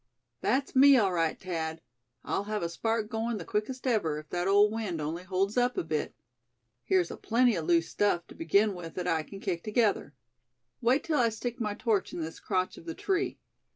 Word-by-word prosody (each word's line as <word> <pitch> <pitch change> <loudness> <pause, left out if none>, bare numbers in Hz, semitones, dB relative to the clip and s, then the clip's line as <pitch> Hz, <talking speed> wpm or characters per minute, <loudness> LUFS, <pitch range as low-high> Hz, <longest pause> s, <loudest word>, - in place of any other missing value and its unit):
"That's 270 +5 0
me, 275 +1 +8
all 200 -6 +2
right, 165 -2 0
Thad; 165 -3 -3 0.4
I'll 200 - -2
have 210 -2 -2
a 170 - -1
spark 225 +5 -1
going 225 0 -2
the 175 - -7
quickest 250 +8 -3
ever, 205 - +1
if 155 0 -9
that 175 +1 -1
old 205 +2 +5
wind 215 -7 -3
only 155 +3 -3
holds 190 +4 -1
up 245 0 +2
a - - +1
bit. 155 -2 -2 0.7
Here's 175 +7 +2
aplenty 240 0 +2
of 165 -3 -3
loose 170 -1 +3
stuff, 190 -4 +1
to - - -10
begin 200 +6 +2
with, 170 -3 -8
that 180 -1 -3
I 165 -2 +2
can 195 +5 -10
kick 175 -4 -3
together. 215 -8 +1 0.7
Wait 255 +4 +3
till 310 -3 0
I 235 -2 +4
stick 235 +2 -5
my 210 -2 -1
torch 220 -4 0
in - - -4
this 160 0 -5
crotch 185 -2 -1
of - - -15
the 165 - -4
tree. 385 -1 -1
200 Hz, 205 wpm, -29 LUFS, 170-230 Hz, 0.7 s, me